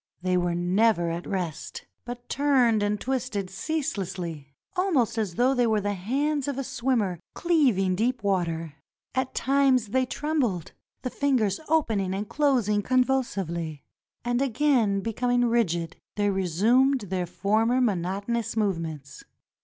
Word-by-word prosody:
They 185 0 +1
were 175 -1 +1
never 175 0 +2
at 170 +1 -5
rest, 180 -6 -4 0.2
but 245 0 -7
turned 255 -6 +3
and 205 0 0
twisted 245 -7 -2
ceaselessly, 185 - -3 0.2
almost 305 - +1
as 210 -6 -2
though 250 +3 +3
they 245 -2 +2
were 220 -1 +2
the 205 0 -1
hands 275 +9 -1
of 280 -2 -2
a 275 - -1
swimmer 235 -9 -1 0.2
cleaving 250 - +2
deep 235 +3 0
water. 165 -5 -1 0.4
At 260 0 -2
times 265 -4 +2
they 255 +3 +1
trembled 255 - -1 0.2
— - - -56
the 255 - -3
fingers 250 -9 +1
opening 220 -12 +1
and 205 +2 -3
closing 245 -9 +2
convulsively; 195 - 0 0.4
and 245 +1 +1
again 250 -6 +2
becoming 245 +3 +1
rigid 175 -8 0 0.2
they 205 -1 +1
resumed 220 - +2
their 185 -3 -3
former 220 +7 +1
monotonous 205 +1 -1
movements. 165 -9 -2
220 Hz, 135 wpm, -26 LUFS, 185-255 Hz, 0.4 s, turned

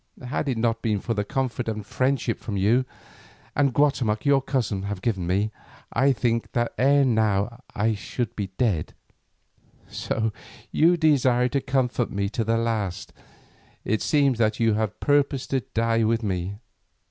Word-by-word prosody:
Had 140 +2 -2
it 125 - -1
not 115 0 0
been 105 -3 0
for 115 - -2
the 105 -2 -1
comfort 125 0 -2
and 105 -2 -4
friendship 130 0 -1
which 100 -3 -2
you 115 +7 +3 0.7
and 140 -1 +3
Guatemoc 125 -6 +1
your 140 -1 +4
cousin 125 -8 -1
have 100 0 -4
given 95 -4 -1
me, 100 +4 +1 0.4
I 140 +1 +4
think 115 -2 -1
that 120 -1 0
ere 140 +2 +4
now 110 0 +1
I 110 +2 +1
should 115 +3 -4
be 100 -2 -3
dead. 100 -11 0 0.9
So 110 -1 -2 0.4
you 170 +3 +4
desire 130 -6 +3
to 140 +1 0
comfort 130 -2 0
me 100 0 -2
to 115 - -2
the 115 +1 +1
last; 110 -6 -2 0.7
it 110 +1 0
seems 140 -5 +2
that 110 -1 +1
you 115 -1 +3
even 110 0 +1
purposed 145 -2 +1
to 135 - +2
die 115 0 0
with 115 +1 +1
me. 95 -1 -2
115 Hz, 160 wpm, -25 LUFS, 105-130 Hz, 0.9 s, your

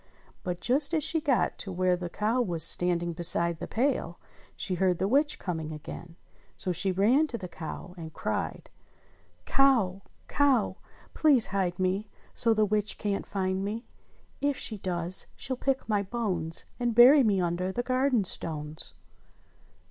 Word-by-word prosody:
But 180 -1 -4
just 280 +6 +2
as 310 - +1
she 320 +2 +1
got 275 -5 +1
to 195 - -5
where 185 0 +2
the 175 -1 -5
cow 220 +7 0
was 170 -8 -1
standing 175 0 +1
beside 170 0 +2
the - - -5
pail, 235 -9 -1 0.4
she 190 - -1
heard 180 -1 +1
the 190 - 0
witch 290 +6 +2
coming 160 -4 -4
again, 160 +2 -9 0.4
so 185 - -2
she 190 +2 +1
ran 230 +12 +3
to 240 - -5
the 185 - -7
cow 170 +1 -8
and 160 -3 -8
cried: 110 - -4 0.7
"Cow! 230 -9 +3 0.3
Cow, 275 -6 +2 0.4
please 280 -7 +5
hide 180 -3 0
me 190 +3 -1 0.2
So 230 - +3
the 215 0 +3
witch 210 0 -1
can't 200 -1 -2
find 190 -1 -1
me. 220 +4 -4 0.6
If 285 -1 +1
she 215 -3 -1
does 175 -1 -3
she'll 265 - -3
pick 270 +1 -1
my 210 -2 +1
bones. 185 -7 -2
And 240 -2 0
bury 260 +5 +8
me 210 -6 +2
under 180 +1 -1
the 245 +5 -2
garden 255 -2 +2
stones 155 -4 -6
195 Hz, 160 wpm, -28 LUFS, 175-245 Hz, 0.7 s, bury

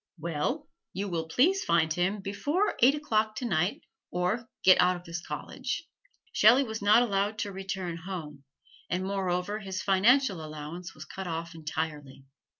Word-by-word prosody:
"Well, 170 - -2 0.3
you 200 +2 -3
will 165 -2 -2
please 360 - +3
find 160 -2 +2
Him 190 +4 0
before 290 - 0
eight 265 +4 +7
o'clock 220 -7 0
tonight 195 -6 0 0.3
or 185 +7 -1
get 185 - +7
out 180 0 +4
of 175 - -9
this 170 0 -6
college." - - -5 0.5
Shelley 235 +6 +6
was 220 -4 -5
not 210 +4 +6
allowed 205 -1 0
to 205 -2 -3
return 190 -3 -4
home, 160 -5 -7 0.5
and 180 +1 -1
moreover 190 +1 -1
his 190 -3 -5
financial 200 - +3
allowance 155 +3 -7
was 155 - -9
cut 190 +3 -7
off 165 0 -4
entirely. 150 -4 -5
190 Hz, 155 wpm, -29 LUFS, 165-215 Hz, 0.5 s, eight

